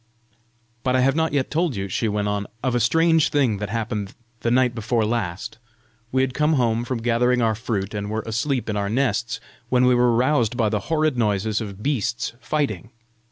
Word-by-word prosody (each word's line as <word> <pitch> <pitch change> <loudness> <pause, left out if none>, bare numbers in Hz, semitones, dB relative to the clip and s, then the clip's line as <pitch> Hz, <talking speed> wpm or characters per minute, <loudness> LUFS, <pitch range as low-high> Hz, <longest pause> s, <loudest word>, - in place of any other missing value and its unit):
" 115 0 -41
But 130 0 +1
I 130 - +3
have 135 +2 +3
not 160 0 +1
yet 140 -2 0
told 165 -3 0
you," 100 0 -3
she 110 +4 -1
went 105 -1 -1
on, 105 0 -2 0.2
"of 130 - +1
a 120 - +2
strange 165 +6 +3
thing 130 -8 +2
that 105 0 -4
happened 110 -3 -3 0.2
the 115 - -1
night 125 0 +3
before 115 0 0
last! 105 -2 -3 0.5
We 130 0 +2
had 130 -1 -1
come 150 +4 +2
home 120 -4 +1
from 120 -3 -3
gathering 125 +1 +2
our 110 -1 +3
fruit, 105 -3 -3
and 105 -1 -3
were 110 0 -2
asleep 120 +4 -1
in 110 - -2
our 100 -1 -1
nests, 120 0 0 0.3
when 125 0 +3
we 125 - +5
were 120 -1 +3
roused 125 -2 +2
by 110 -4 +2
the 105 0 0
horrid 155 -5 +1
noises 105 0 0
of 100 -1 -7
beasts 120 -5 -1
fighting. 115 - -2
115 Hz, 205 wpm, -23 LUFS, 105-130 Hz, 0.5 s, we